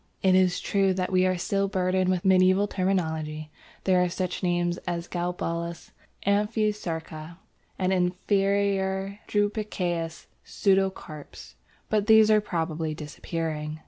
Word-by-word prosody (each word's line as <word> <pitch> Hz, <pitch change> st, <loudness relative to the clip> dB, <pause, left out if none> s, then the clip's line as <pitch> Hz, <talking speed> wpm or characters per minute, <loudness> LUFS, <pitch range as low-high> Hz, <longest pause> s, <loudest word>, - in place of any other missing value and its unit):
It 190 Hz, -1 st, +5 dB
is 185 Hz, -1 st, +3 dB
true 195 Hz, -2 st, +1 dB
that 185 Hz, 0 st, -2 dB
we 185 Hz, 0 st, +3 dB
are 185 Hz, -1 st, 0 dB
still 195 Hz, +3 st, 0 dB
burdened 185 Hz, -1 st, +1 dB
with 185 Hz, -1 st, 0 dB
medieval 185 Hz, +1 st, +4 dB
terminology. 160 Hz, -6 st, -2 dB, 0.3 s
There 185 Hz, -1 st, +3 dB
are 180 Hz, -, +2 dB
such 180 Hz, 0 st, -3 dB
names 175 Hz, -1 st, 0 dB
as 170 Hz, 0 st, -3 dB
"galbulus," 170 Hz, -1 st, -4 dB, 0.3 s
"amphisarca," 200 Hz, -6 st, -1 dB, 0.4 s
and 185 Hz, 0 st, +1 dB
"inferior 195 Hz, +1 st, 0 dB
drupaceous 190 Hz, -6 st, -2 dB, 0.2 s
pseudocarps," 190 Hz, -6 st, -2 dB, 0.3 s
but 210 Hz, -1 st, 0 dB
these 220 Hz, -1 st, +7 dB
are 215 Hz, 0 st, +5 dB
probably 160 Hz, -5 st, -2 dB
disappearing. 155 Hz, 0 st, -4 dB
185 Hz, 115 wpm, -26 LUFS, 170-195 Hz, 0.4 s, these